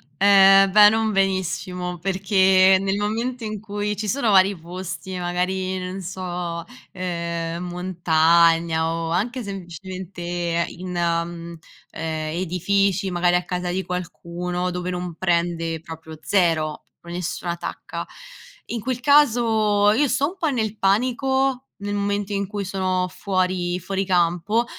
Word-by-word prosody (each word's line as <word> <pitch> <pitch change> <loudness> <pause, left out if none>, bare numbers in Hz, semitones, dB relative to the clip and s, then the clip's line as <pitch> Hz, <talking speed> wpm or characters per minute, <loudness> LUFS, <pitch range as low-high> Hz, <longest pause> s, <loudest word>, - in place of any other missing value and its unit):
Ehm, 195 0 +6
beh, 210 +1 +8
non 220 0 +1
benissimo, 185 -2 -1
perché 190 0 +4
nel 195 0 0
momento 230 +4 -2
in 215 -1 -4
cui 210 0 -3
ci 210 +1 -4
sono 235 0 +1
vari 195 0 +5
posti, 180 +2 -7
magari, 185 +1 -1
non 185 +1 -5
so, 175 -2 -5 0.3
ehm, 170 -2 -3
montagna 170 -2 +2
o 165 0 -3
anche 240 +8 -1
semplicemente 175 -2 -4
in, 185 +1 -8
mhmm, 170 0 -2 0.3
ehm, 160 0 -3
edifici, 195 +2 0
magari 175 0 +2
a 180 - +1
casa 180 -1 -3
di 190 +2 -1
qualcuno 180 0 -4
dove 180 0 -4
non 180 -1 -4
prende, 170 -2 -1
proprio 160 -1 -10
0, 155 -2 +1
pro 170 - -11
nessuna 175 0 -3
tacca. 170 - -6 0.7
In 235 - -2
quel 255 +2 -2
caso 225 -7 +4
io 275 +7 +3
sto 275 +2 +1
un 365 - -11
po' 320 - +1
nel 220 -5 -2
panico, 255 +5 +1 0.2
nel 205 0 -4
momento 205 0 -1
in 200 0 -1
cui 205 0 -4
sono 185 -1 0
fuori 185 -1 -1
fuori 195 +2 -2
campo 180 +4 +1
185 Hz, 135 wpm, -22 LUFS, 175-200 Hz, 0.7 s, beh